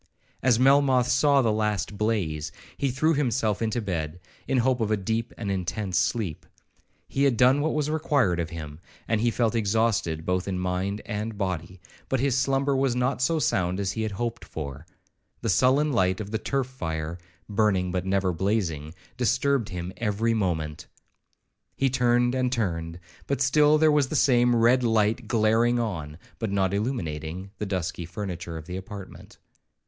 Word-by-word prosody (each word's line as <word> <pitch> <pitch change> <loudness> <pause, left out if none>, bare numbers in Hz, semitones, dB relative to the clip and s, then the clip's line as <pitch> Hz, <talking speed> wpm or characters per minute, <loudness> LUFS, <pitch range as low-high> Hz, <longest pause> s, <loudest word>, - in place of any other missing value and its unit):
As 125 -3 +4
Melmoth 135 -1 +4
saw 140 0 +4
the 115 - +2
last 105 -1 -1
blaze, 100 -9 -1 0.2
he 140 - 0
threw 155 +6 +2
himself 120 -7 0
into 115 +1 0
bed, 85 -4 -3 0.3
in 135 - +1
hope 125 0 +2
of 110 - 0
a 110 - +2
deep 110 +4 -2
and 100 -4 -3
intense 95 +1 -2
sleep. 105 -10 -2 0.6
He 140 - +1
had 130 -4 +2
done 130 +4 +5
what 155 +1 0
was 150 -1 0
required 145 - +1
of 85 -1 -2
him, 75 -2 -8 0.3
and 110 -1 +1
felt 115 -1 +1
exhausted 105 -7 0
both 90 +1 0
in 95 -2 -2
mind 90 +3 -2
and 105 0 -4
body; 90 -2 -3 0.3
but 135 - +1
his 135 -1 +1
slumber 135 +1 +1
was 135 -2 +1
not 125 +1 0
so 165 +5 +2
sound 90 - 0
as 95 -1 -1
he 110 - -3
had 110 -2 -2
hoped 115 +3 -3
for. 70 0 -7 0.5
The 115 - -1
sullen 135 +8 +3
light 95 -4 +2
of 105 -1 -6
the 110 - -1
turf 135 +1 -1
fire, 80 -9 -5 0.3
burning 100 -4 +1
but 90 0 -1
never 95 -1 +1
blazing, 85 -5 -1 0.2
disturbed 125 0 +1
him 90 0 -5
every 115 0 0
moment. 80 -8 -2 0.9
He 135 -1 +1
turned 120 -1 +2
and 130 -1 0
turned, 85 -8 -2 0.3
but 140 - -1
still 150 +3 +4
there 155 0 +4
was 145 -2 +3
the 155 - -4
same 120 -2 +4
red 120 +2 +4
light 110 0 +1
glaring 115 +1 +3
on, 85 -10 -3 0.2
but 110 - -2
not 95 -1 +1
illuminating, 95 - -3
the 105 - -2
dusky 90 -3 -3
furniture 85 -3 -5
of 80 - -9
the 90 +2 -5
apartment. 95 0 -10
110 Hz, 170 wpm, -26 LUFS, 90-125 Hz, 0.9 s, done